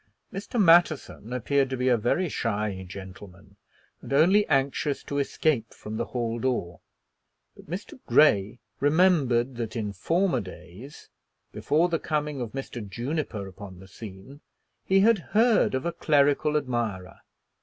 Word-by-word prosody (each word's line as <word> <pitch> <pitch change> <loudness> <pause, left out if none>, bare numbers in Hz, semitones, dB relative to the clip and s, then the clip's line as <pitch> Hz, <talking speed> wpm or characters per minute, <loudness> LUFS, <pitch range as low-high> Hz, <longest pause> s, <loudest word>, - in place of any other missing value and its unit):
Mr. 200 +4 -4
Matterson 165 - +3
appeared 135 +2 +1
to 130 - -3
be 125 +1 -1
a 125 - +5
very 120 - 0
shy 105 - -2
gentleman, 95 +1 -11 0.5
and - - -10
only 180 +9 +4
anxious 140 0 0
to 145 - -3
escape 140 -4 -1
from 110 +1 -7
the - - -1
hall 120 -2 -3
door. 115 -9 -2 0.8
But - - -16
Mr. 195 +8 -7
Grey 105 -8 +4 0.2
remembered 140 -6 +2
that 115 -1 -4
in 105 -3 -3
former 180 - +1
days, 100 - -12 0.4
before 160 +4 +1
the 165 -2 -1
coming 150 -3 -2
of 115 -3 -5
Mr. 135 -4 -6
Juniper 120 -3 -4
upon 95 0 -11
the 95 - -13
scene, 105 +7 -11 0.4
he 195 0 +4
had 225 0 +4 0.2
heard 225 - +4
of 130 - -3
a 170 - 0
clerical 145 0 +2
admirer. 115 -9 -3
130 Hz, 145 wpm, -26 LUFS, 105-155 Hz, 0.8 s, a